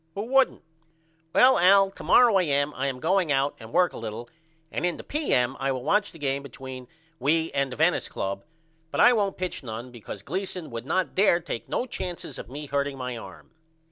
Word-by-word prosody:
Who 200 - -2
wouldn't? 265 +3 +2 0.7
Well 260 +7 +6
Al 195 +2 +6
to - - -11
morrow 235 -6 +6
A.M. 145 -3 +1
I 130 +2 -1
am 130 -2 -3
going 175 +1 +1
out 140 +1 +2
and 110 0 -11
work 180 +6 +3
a - - -7
little 115 +1 -6 0.4
and - - -3
in 175 -1 0
the - - -9
P.M. 135 - 0
I 135 0 0
will 130 -2 -3
watch 205 +4 +2
the 165 - -13
game 140 -2 -1
between 130 -1 -9 0.3
we 160 +4 +1
and 140 -1 0
the - - -5
Venice 160 +4 +2
Club 100 0 -4 0.5
but - - -4
I 245 - +7
won't 205 -4 0
pitch 185 0 -4
none 120 0 -7
because 110 -4 -9
Gleason 180 - -4
would 115 +2 -6
not 185 +4 0
dare 185 -3 +4
take 160 -9 -6
no - - -1
chances 180 -8 -6
of - - -9
me 145 +3 -6
hurting 140 0 -2
my 125 -1 -4
arm. 115 - -11
145 Hz, 205 wpm, -26 LUFS, 130-185 Hz, 0.7 s, I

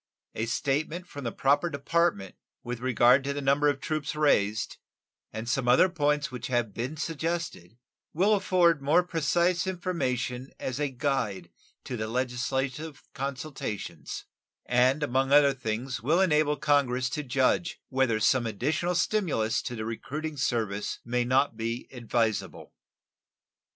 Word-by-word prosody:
A 115 - -2
statement 150 +8 -1
from 145 -6 -8
the 115 - -1
proper 145 +7 +2
department 140 - 0 0.3
with 120 0 -4
regard 125 +1 +4
to 140 0 -2
the 145 - -3
number 140 +2 +3
of 140 -1 -1
troops 155 0 -3
raised, 110 -9 +1 0.5
and 110 +1 -6
some 125 +1 0
other 130 +10 +6
points 150 -5 0
which 125 0 -5
have 120 -5 0
been 125 +8 -4
suggested, 160 - -3 0.3
will 195 +7 +3
afford 180 -6 +3
more 155 +6 +4
precise 175 +1 +1
information 130 -9 -2
as 130 +1 -3
a 145 -1 0
guide 120 - -2 0.3
to 125 - -5
the 110 0 -3
legislative 130 +5 -2
consultations, 135 -5 -5 0.4
and 130 +4 +3
among 135 0 +1
other 140 -1 +6
things 120 0 -3
will 155 +9 +2
enable 150 -5 +3
Congress 140 -4 +2
to 150 - -2
judge 135 +5 +1
whether 130 -5 +1
some 120 +2 +3
additional 155 - -1
stimulus 170 - +1
to 125 - -5
the 110 -1 -4
recruiting 150 +7 -5
service 110 -7 -1
may 120 +1 0
not 130 0 +2
be 115 +2 -4
advisable. 115 -6 -2
135 Hz, 140 wpm, -28 LUFS, 120-155 Hz, 0.5 s, other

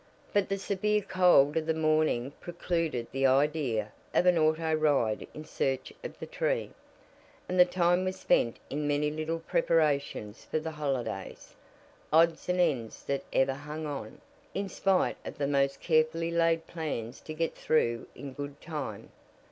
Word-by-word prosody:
But 205 -3 +2
the 195 - 0
severe 210 +1 0
cold 180 -7 +4
of 160 -1 -1
the 160 - +1
morning 155 -5 +1
precluded 165 -7 -2
the 135 0 +2
idea 135 -6 +1 0.2
of - - +4
an 180 -1 +5
auto 160 0 +2
ride 145 -8 +1
in 155 - -7
search 135 -3 -2
of - - -7
the - - -6
tree, - - -1 0.8
and 180 0 -1
the 180 - +9
time 175 0 +2
was 185 0 -3
spent 115 - +2
in 145 +1 -1
many 145 +1 +1
little 155 +2 -2
preparations 145 -9 0
for - - -2
the 160 +1 -5
holiday 130 -10 -3 0.8
odds 165 +2 +3
and 180 0 +1
ends 135 -11 0
that 140 0 -1
ever 135 0 +2
hang 150 +3 -6
on, 140 -7 -6 0.3
in 195 0 -2
spite 190 0 +1
of - - -7
the 145 - 0
most 140 -1 +1
carefully 165 +1 +2
laid 165 -1 +2
plans 140 -8 -5
to 155 - -7
get 165 +1 -1
through 120 -7 0
in 140 -2 -8
good 145 +1 -7
time. 150 -11 -6
155 Hz, 160 wpm, -29 LUFS, 140-170 Hz, 0.8 s, the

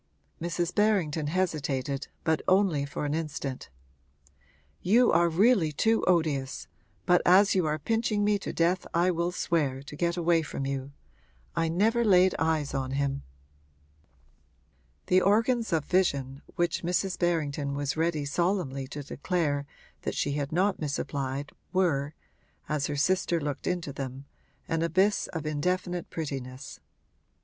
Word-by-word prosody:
Mrs. 170 +1 -2
Berrington 175 -8 +1
hesitated, 145 -6 -1 0.2
but 160 -1 +1
only 185 -7 +3
for 140 +2 -4
an 145 - -1
instant. 150 -4 -4 1.1
'You 235 +6 +4
are 170 +1 +4
really 185 -1 +3
too 220 +9 +2
odious, 155 -7 0 0.4
but 180 -1 +4
as 195 +3 +6
you 185 -4 +2
are 155 0 0
pinching 220 +4 0
me 205 0 +2
to - - -5
death 175 +2 +1
I 175 +2 +3
will 170 0 -1
swear, 145 -7 -1
to 145 - -9
get 170 +2 0
away 170 -1 +3
from 145 -3 -5
you. 135 0 -3 0.6
I 165 0 +1
never 220 +8 +2
laid 185 -3 +5
eyes 160 -3 0
on 135 -1 -2
him.' 140 0 -1 1.8
The 185 +1 +4
organs 225 +3 +2
of 160 -3 +1
vision 140 -7 0
which 175 -2 0
Mrs. 180 +2 -1
Berrington 150 -5 0
was 145 0 -2
ready 160 -2 0
solemnly 140 -4 -1
to 145 +1 -7
declare 145 -1 -1 0.3
that - - -3
she 145 - 0
had 145 +1 -2
not 190 +4 +1
misapplied 140 -1 -3 0.2
were, 155 -6 +1 0.5
as 150 -2 -1
her 150 - -3
sister 175 +2 +1
looked 145 -3 -4
into 175 -6 -2
them, 135 0 -6 0.4
an 165 0 -1
abyss 185 +5 +2
of 160 -3 -5
indefinite 180 +4 -1
prettiness. 135 -3 -6
165 Hz, 140 wpm, -28 LUFS, 140-180 Hz, 1.8 s, as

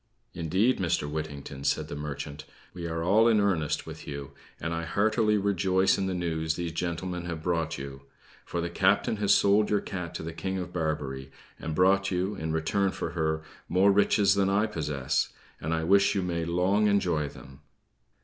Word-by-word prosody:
"Indeed, 95 +9 +1
Mr. 85 -5 0
Whittington," 75 -3 -5
said - - 0
the - - -6
merchant, 75 0 -6 0.3
"we 85 -2 -5
are 80 0 -2
all 105 +6 +5
in 110 -2 +4
earnest 90 -7 0
with - - -9
you; 70 -1 -6 0.3
and 85 +2 -3
I 85 - -2
heartily 105 +4 +2
rejoice 95 -1 +2
in 95 - -1
the 95 - -2
news 80 -3 -1
these 85 -1 -3
gentlemen 85 +1 -3
have 85 -2 -5
brought 85 -2 -1
you; 70 0 -7 0.4
for 85 - -3
the 85 - -2
captain 95 +4 +2
has 100 -1 +2
sold 105 +1 +4
your 105 - +3
cat 90 -4 -6
to - - -4
the 80 +1 -5
King 95 +3 -3
of 90 -1 -5
Barbary, 75 -5 -3 0.3
and 80 -1 -4
brought 95 +2 +4
you, 95 +2 -1
in 80 -5 -4
return 80 +5 +1
for 85 - -4
her, 80 -2 -1 0.3
more 95 +3 +5
riches 100 0 +4
than 100 -1 +2
I 100 +2 +3
possess; 75 -10 -1 0.3
and 80 - -3
I 80 0 0
wish 100 +4 +4
you 95 - +1
may 85 -2 -2
long 95 +5 +2
enjoy 90 -8 +1
them!" 70 0 -13
85 Hz, 190 wpm, -28 LUFS, 80-100 Hz, 0.4 s, all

